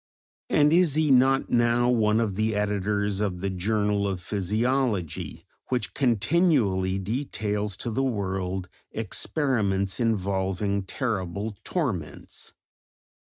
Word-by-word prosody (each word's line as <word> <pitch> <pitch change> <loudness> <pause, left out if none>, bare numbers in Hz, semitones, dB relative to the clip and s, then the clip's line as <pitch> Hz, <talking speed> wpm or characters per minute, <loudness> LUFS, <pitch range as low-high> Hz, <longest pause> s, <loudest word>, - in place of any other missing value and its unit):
And 150 +1 +4
is 170 -4 +4
he 155 -2 +2
not 135 +1 +4
now 120 0 +3
one 110 -3 +3
of 110 -4 0
the 110 +1 0
editors 105 0 0
of 90 -4 -2
the 100 0 -1
Journal 105 +1 0
of 95 -2 -2
Physiology, 105 - -1 0.2
which 125 -1 -2
continually 115 - +2
details 105 -2 -2
to 115 - -4
the 130 - 0
world 95 -6 -2 0.2
experiments 105 - -1
involving 100 -2 0
terrible 105 -3 -3
torments? 115 - -4
105 Hz, 110 wpm, -26 LUFS, 95-125 Hz, 0.2 s, And